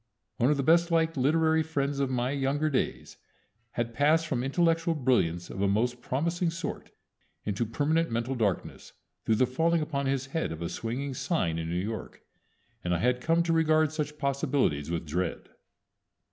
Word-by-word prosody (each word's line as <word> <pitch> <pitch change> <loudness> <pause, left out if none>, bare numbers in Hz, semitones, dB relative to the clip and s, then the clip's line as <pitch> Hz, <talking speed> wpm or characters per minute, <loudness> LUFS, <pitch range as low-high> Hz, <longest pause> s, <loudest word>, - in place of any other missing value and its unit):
One 125 +1 +3
of 150 - +2
the 140 - 0
best 170 +4 +4
liked 165 -1 +2
literary 160 +4 +3
friends 145 -3 -1
of 135 -1 +1
my 125 0 0
younger 145 +2 0
days 130 - -2 0.6
had 115 -1 -2
passed 155 +6 +3
from 125 -6 -1
intellectual 165 +3 +1
brilliance 100 - +1
of 95 - -5
a 100 - +3
most 120 +5 0
promising 170 +7 0
sort 165 0 -5 0.6
into 105 +2 -1
permanent 155 +8 +1
mental 115 +3 -1
darkness 105 -7 -2 0.3
through 110 - +3
the 130 - +4
falling 165 +7 +1
upon 140 -3 -2
his 135 -1 0
head 160 - -1
of 80 +1 -5
a 85 - -2
swinging 125 +9 -3
sign 90 - -1
in 80 0 -4
New 85 - -2
York, 105 +5 -4 0.6
and 90 0 +1
I - - +1
had 125 +6 +1
come 165 +4 +2
to 170 -1 +1
regard 155 -2 +3
such 150 -1 -3
possibilities 140 - 0
with 85 -1 -2
dread. 85 +3 -3
135 Hz, 175 wpm, -28 LUFS, 115-160 Hz, 0.6 s, best